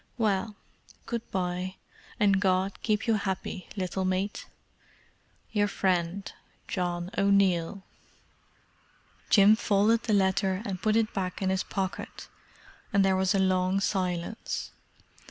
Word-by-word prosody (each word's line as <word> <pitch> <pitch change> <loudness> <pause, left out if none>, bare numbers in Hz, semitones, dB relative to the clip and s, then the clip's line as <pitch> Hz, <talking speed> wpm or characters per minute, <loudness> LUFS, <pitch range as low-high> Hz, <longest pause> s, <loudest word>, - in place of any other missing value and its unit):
"Well, 215 -1 0 0.5
good 235 -1 -4
bye—and 185 +2 -2
God 190 0 +1
keep 215 -1 0
you 230 - +3
happy, 195 -2 -3
little 190 -1 -2
mate. 185 +2 -2 1.0
"Your 205 -1 +2
friend, 185 -1 -1 0.4
"John 175 -1 -2
O'Neill." 195 -2 +2 1.5
Jim 205 +1 +7
folded 220 +1 +2
the 220 - -1
letter 190 0 +2
and 190 -4 -4
put 215 0 +2
it 225 -1 +1
back 185 -2 -3
in 190 -1 0
his 190 0 +1
pocket, 190 -2 -4 0.6
and 195 0 +4
there 190 0 +3
was 190 +2 +2
a - - +3
long 185 0 +2
silence. 185 0 -2
195 Hz, 120 wpm, -28 LUFS, 185-205 Hz, 1.5 s, Jim